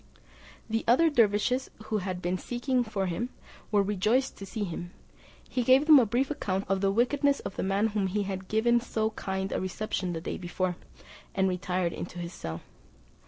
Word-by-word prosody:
The 225 Hz, 0 st, -1 dB
other 310 Hz, +8 st, +5 dB
dervises, 235 Hz, +1 st, +2 dB
who 215 Hz, 0 st, -1 dB
had 185 Hz, -1 st, -4 dB
been 180 Hz, +1 st, 0 dB
seeking 245 Hz, +1 st, 0 dB
for 210 Hz, -4 st, -2 dB
him, 190 Hz, +8 st, -2 dB, 0.4 s
were 205 Hz, -2 st, +4 dB
rejoiced 210 Hz, +7 st, +1 dB
to 195 Hz, -, -8 dB
see 215 Hz, +2 st, -3 dB
him; 175 Hz, -1 st, -5 dB, 0.6 s
he 255 Hz, -, -1 dB
gave 260 Hz, +4 st, +5 dB
them 305 Hz, -2 st, +9 dB
a 235 Hz, -, +3 dB
brief 255 Hz, +6 st, 0 dB
account 195 Hz, -9 st, -2 dB
of 195 Hz, 0 st, 0 dB
the 195 Hz, -, +3 dB
wickedness 275 Hz, +7 st, +2 dB
of 195 Hz, -, -6 dB
the -, -, -2 dB
man 195 Hz, +2 st, +1 dB
to 225 Hz, -, +3 dB
whom 205 Hz, -2 st, 0 dB
he 205 Hz, +2 st, 0 dB
had 190 Hz, -1 st, -5 dB
given 235 Hz, +3 st, +3 dB
so 220 Hz, -2 st, -1 dB
kind 190 Hz, -1 st, -3 dB
a -, -, -1 dB
reception 185 Hz, -1 st, -2 dB
the 165 Hz, -, -3 dB
day -, -, -4 dB
before, 180 Hz, 0 st, -2 dB, 0.6 s
and 190 Hz, 0 st, +3 dB
retired 180 Hz, -1 st, -1 dB
into 180 Hz, -, -6 dB
his 175 Hz, 0 st, -5 dB
cell. 80 Hz, 0 st, -6 dB
205 Hz, 195 wpm, -29 LUFS, 185-240 Hz, 0.6 s, them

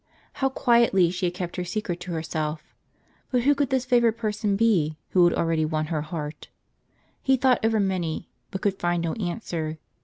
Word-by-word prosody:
How 270 Hz, -, +3 dB
quietly 235 Hz, -9 st, +3 dB
she 180 Hz, 0 st, -1 dB
had 175 Hz, -, -4 dB
kept 180 Hz, -1 st, -5 dB
her 180 Hz, -, -1 dB
secret 180 Hz, -1 st, -3 dB
to 180 Hz, -, -7 dB
herself! 160 Hz, -1 st, -3 dB, 0.6 s
But 250 Hz, -2 st, +1 dB
who 285 Hz, +3 st, +5 dB
could 285 Hz, -2 st, 0 dB
this 260 Hz, -1 st, +1 dB
favored 240 Hz, -3 st, +3 dB
person 210 Hz, -2 st, -1 dB
be, 185 Hz, -9 st, +2 dB
who 180 Hz, -, +4 dB
had 175 Hz, -, +4 dB
already 165 Hz, -1 st, +1 dB
won 155 Hz, 0 st, -1 dB
her 155 Hz, -, 0 dB
heart? 150 Hz, -1 st, -6 dB, 0.7 s
He 265 Hz, -1 st, +3 dB
thought 255 Hz, -2 st, +3 dB
over 225 Hz, -1 st, +2 dB
many, 180 Hz, -5 st, -1 dB, 0.2 s
but 190 Hz, -, -5 dB
could 195 Hz, -2 st, 0 dB
find 175 Hz, -1 st, 0 dB
no 165 Hz, -, -1 dB
answer. 170 Hz, -6 st, -3 dB
185 Hz, 185 wpm, -25 LUFS, 165-230 Hz, 0.7 s, who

